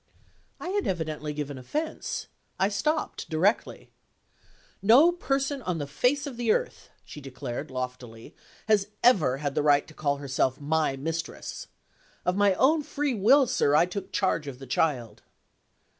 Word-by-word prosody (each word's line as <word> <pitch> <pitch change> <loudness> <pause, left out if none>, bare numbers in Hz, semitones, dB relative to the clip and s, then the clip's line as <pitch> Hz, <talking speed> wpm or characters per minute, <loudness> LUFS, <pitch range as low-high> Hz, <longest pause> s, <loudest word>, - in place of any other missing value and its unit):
I 355 - -5
had 405 +1 -1
evidently 155 -4 -3
given 145 -2 -5
offense; 305 - -4 0.3
I 195 - +3
stopped 300 +11 -2
directly. 180 +7 0 0.9
"No 250 - +7
person 275 -4 -1
on 180 -7 -2
the 145 - -3
face 250 - 0
of 270 -5 -7
the 235 -2 +1
earth," - - -2 0.2
she 150 - -10
declared, 135 +1 -6
loftily, 125 -3 -6 0.3
"has 210 -2 +3 0.2
ever 170 - +4
had 145 -1 -3
the - - +1
right 145 -1 +3
to - - -14
call 145 -2 -1
herself 130 -2 -1
my 150 -1 0
mistress. 165 +4 -5 0.6
Of 180 - +1
my 200 -1 +3
own 300 - +3
free 290 -1 -2
will, 250 +7 +5
sir, 145 - +2
I 160 - +5
took 190 +2 -6
charge 165 -6 0
of 135 -3 -6
the 135 - -10
child." 125 -6 -1
165 Hz, 155 wpm, -27 LUFS, -, 0.9 s, No